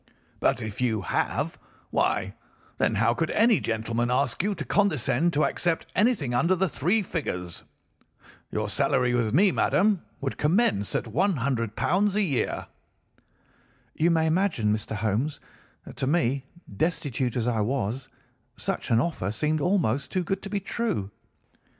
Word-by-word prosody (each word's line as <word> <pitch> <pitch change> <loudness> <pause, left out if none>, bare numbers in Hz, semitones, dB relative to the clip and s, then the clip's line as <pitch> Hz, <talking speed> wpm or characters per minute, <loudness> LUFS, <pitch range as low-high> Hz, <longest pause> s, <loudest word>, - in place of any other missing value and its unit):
But - - +1
if 110 +1 -5
you 110 -4 +1
have - - -1 0.3
why, - - 0 0.5
then, 110 - +2
how 115 +3 +3
could 165 +6 -1
any 225 -2 +4
gentleman 115 +1 -1
ask 130 +1 +1
you 200 +2 0
to 155 - -5
condescend 175 - +2
to 150 +1 +3
accept 170 -2 0
anything 205 - +2
under 170 +9 +3
the 190 +1 +1
three 180 +8 +1
figures? 90 - -4 0.9
Your - - -1
salary 125 -1 +1
with 115 -3 +1
me, 185 - +5
madam, 200 0 +2 0.2
would 135 -1 -4
commence 150 - +2
at - - +1
£ - - -12
100 120 - 0 0.4
a 210 - +3
year.' 145 -9 -1 1.3
"You 165 - +2
may 165 -1 +3
imagine, 160 - +1
Mr. 110 0 -3
Holmes, 110 +8 -1 0.5
that - - -11
to 130 - -1
me, 135 -3 +1 0.3
destitute 135 - -1
as 120 -1 0
I 115 -2 +1
was, 125 +2 -2 0.5
such - - -3
an 115 - +4
offer 130 - -1
seemed 150 +8 0
almost 145 - +1
too 185 -1 0
good 195 +2 -2
to 200 - -7
be 205 0 -1
true. 195 - -2
140 Hz, 150 wpm, -26 LUFS, 115-180 Hz, 1.3 s, me